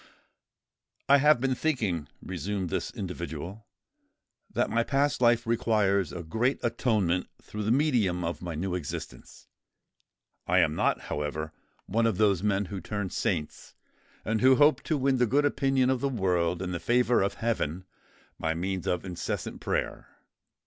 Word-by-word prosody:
"I 140 - +7
have 150 -1 +5
been 130 +1 +1
thinking," 110 - -1 0.2
resumed 95 -1 -3
this - - -1
individual, 90 +2 -6 0.8
"that - - 0
my 115 +1 +2
past 140 +1 +1
life 120 0 +4
requires 105 -5 +1
a 90 - -6
great 115 +11 0
atonement 110 -7 +1
through 105 - -7
the 105 +2 0
medium 120 - +2
of 85 +1 -3
my 85 -3 -5
new 90 +4 -2
existence. 90 -6 -7 1.0
I - - +3
am - - +4
not, - - +1
however, 75 +2 -4 0.3
one 115 +3 +1
of 110 -5 0
those 100 -4 +3
men 100 -1 +1
who 95 +1 -6
turn 105 +1 -4
saints, 80 -6 -3 0.5
and 110 +1 0
who 130 +1 +6
hope 150 +3 +4
to 155 - +1
win 135 -1 +2
the 125 - +3
good 145 +6 +2
opinion 135 -2 +2
of 130 -2 -1
the 140 - +1
world 90 -6 0
and 90 0 -3
the 85 - -2
favour 120 +6 +2
of 100 - 0
heaven 95 -7 -2 0.5
by 80 0 -1
means 95 +1 -3
of 90 +1 -1
incessant 90 -2 -4
prayer. - - -2
105 Hz, 155 wpm, -28 LUFS, 90-125 Hz, 1.0 s, I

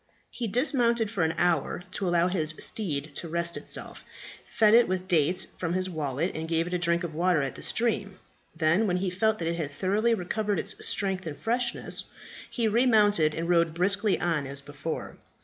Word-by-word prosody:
He 235 - -4
dismounted 235 -2 +1
for 200 -6 -2
an 160 0 +1
hour 175 0 0
to 190 0 -2
allow 175 0 +3
his 155 -4 0
steed 155 -8 -1
to 170 - -4
rest 170 +1 -1
itself, - - -5 0.4
fed 215 -1 +3
it 235 +1 +6
with 185 0 -2
dates 180 +1 +2
from 170 -1 -4
his 185 0 -1
wallet, 155 +1 -2
and 160 +1 -5
gave 165 0 +1
it 175 - -6
a 180 - 0
drink 170 0 +1
of 170 -2 -4
water 170 -2 +2
at 135 - -3
the - - -11
stream. 200 -4 -1 0.4
Then, 165 +7 +2
when 180 -2 +1
he 185 0 -1
felt 220 +4 +1
that 165 - -3
it 170 0 -1
had 155 -4 -3
thoroughly 205 +9 +1
recovered 205 +2 -2
its - - -2
strength 190 -3 -1
and 150 - -5
freshness, 240 +1 -2 0.4
he 235 -3 0
re 235 +4 +3
mounted, 205 -9 +4
and 165 +1 -3
rode 170 -2 +2
briskly 195 +3 +2
on 165 -5 -1
as 140 +1 -5
before. 145 +3 -6
180 Hz, 200 wpm, -27 LUFS, 165-210 Hz, 0.4 s, it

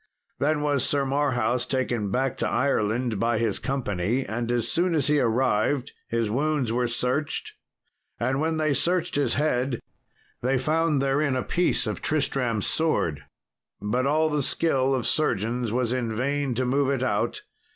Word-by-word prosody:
Then 150 +1 +1
was 145 -3 +1
Sir 140 0 +1
Marhaus 125 -4 0
taken 120 -5 -1
back 130 +5 0
to - - -1
Ireland 120 -3 0
by 115 +1 +1
his 110 -3 0
company; 120 -2 -1
and 115 +3 -3
as 120 -2 0
soon 175 0 +1
as 145 -4 +1
he 150 0 +3
arrived 125 +1 +1 0.2
his 115 -1 0
wounds 140 -2 0
were 125 0 +1
searched, 125 +5 -1 0.7
and 130 +3 0
when 160 0 0
they 155 -2 +1
searched 175 +4 0
his 145 - +1
head 130 -4 0 0.6
they 130 +2 +1
found 155 +1 +1
therein 140 0 +1
a 130 - -1
piece 175 +1 +1
of - - -3
Tristram's 125 -7 0
sword; 85 - 0 0.5
but 125 +6 0
all 155 +2 +3
the 150 -1 +1
skill 135 -2 +1
of 125 - -2
surgeons 120 -4 0
was 120 0 0
in 120 -3 -2
vain 140 +1 -1
to 130 +2 0
move 135 +2 +1
it 135 -2 0
out. 105 -5 -1
130 Hz, 160 wpm, -25 LUFS, 120-145 Hz, 0.7 s, he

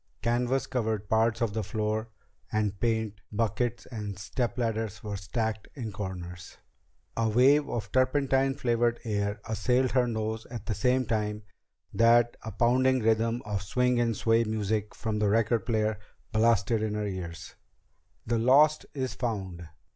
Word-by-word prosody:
Canvas 125 +3 +1
covered 110 -4 -2
parts 110 +1 +2
of 115 -3 0
the 110 - -1
floor, 110 +2 -2 0.4
and 105 -2 -1
paint 110 -3 -1
buckets 115 +3 -1
and 105 -5 -6
stepladders 115 -1 -2
were 105 -1 -4
stacked 110 +2 -3
in 115 -6 -5
corners. 90 -3 -7 0.6
A 115 -1 +1
wave 135 +6 +4
of 115 - -4
turpentine 135 +1 +2
flavored 120 -3 +1
air 100 -2 -1
assailed 125 +4 +1
her 125 0 +3
nose 110 -1 -3
at 115 -4 -7
the 110 - -1
same 125 +5 +1
time 105 -1 -2 0.5
that 120 +1 +4
a 110 - -6
pounding 125 +4 +3
rhythm 115 +2 +1
of 105 -2 -2
swing 125 +5 +1
and 115 -3 +1
sway 115 +1 +3
music 110 -1 -2
from 110 -2 -2
the 105 -1 +2
record 115 +1 +1
player 110 -2 0 0.3
blasted 110 0 +2
in 110 -1 -1
her 105 0 -1
ears. 85 -4 -6 0.7
"The 115 0 0
lost 145 +6 +4
is 130 -2 -2
found!" 95 -8 -4
110 Hz, 145 wpm, -28 LUFS, 105-120 Hz, 0.7 s, wave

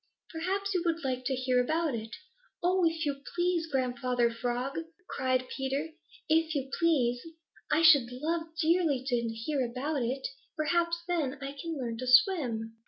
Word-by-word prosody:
Perhaps 390 +5 -2
you 360 - +1
would 335 -2 -1
like 255 -1 -2
to 265 - 0
hear 255 -1 +2
about 315 +2 0
it." 225 -1 -5 0.5
"Oh, 365 +1 +3
if 325 0 -4
you 280 -1 -2
please, 350 -1 +1
Grandfather 250 -2 +1
Frog," 245 +5 -2 0.3
cried 255 -1 0
Peter. 270 +4 -2 0.4
"If 320 0 +2
you 270 -1 -2
please. 255 -8 +2 0.5
I 310 +2 +3
should 285 -7 +7
love 320 +6 -2
dearly 320 -5 +2
to 250 -3 +1
hear 245 +5 -2
about 265 +4 -2
it. 255 +3 -1 0.3
Perhaps 340 +2 +1
then 305 -6 -1
I 275 0 -5
can 315 +3 -5
learn 235 -3 -4
to 255 - -4
swim." 250 - +3
275 Hz, 160 wpm, -30 LUFS, 250-330 Hz, 0.5 s, should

